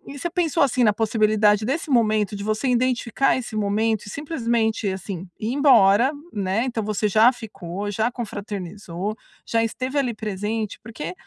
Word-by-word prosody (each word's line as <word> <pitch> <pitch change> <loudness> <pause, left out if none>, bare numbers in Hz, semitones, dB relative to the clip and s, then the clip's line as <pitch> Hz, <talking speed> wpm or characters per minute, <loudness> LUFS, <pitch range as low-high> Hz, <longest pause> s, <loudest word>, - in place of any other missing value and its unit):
e - - -8
você 345 - -2
pensou, 330 -3 +1
assim, 255 -2 +2
na 210 - +4
possibilidade 215 -1 +2
desse 310 +6 -2
momento, 215 -3 +2
de 200 - -5
você 215 +5 -1
identificar 250 +1 +1
esse 240 -3 -6
momento 215 +1 0
e - - -7
simplesmente, 230 -7 -1
assim, 190 -1 -5
ir 220 +2 -2
embora, 250 -3 +5 0.2
né. 200 +2 0
Então 240 -3 -2
você 210 0 0
já 220 +5 +6
ficou, 205 -4 -6
já 220 +3 0
confraternizou, 205 -4 -5 0.3
já 230 0 +1
esteve 255 +5 -3
ali 250 -4 0
presente, 215 0 -3
porque 200 -7 -6
220 Hz, 160 wpm, -23 LUFS, 205-245 Hz, 0.3 s, já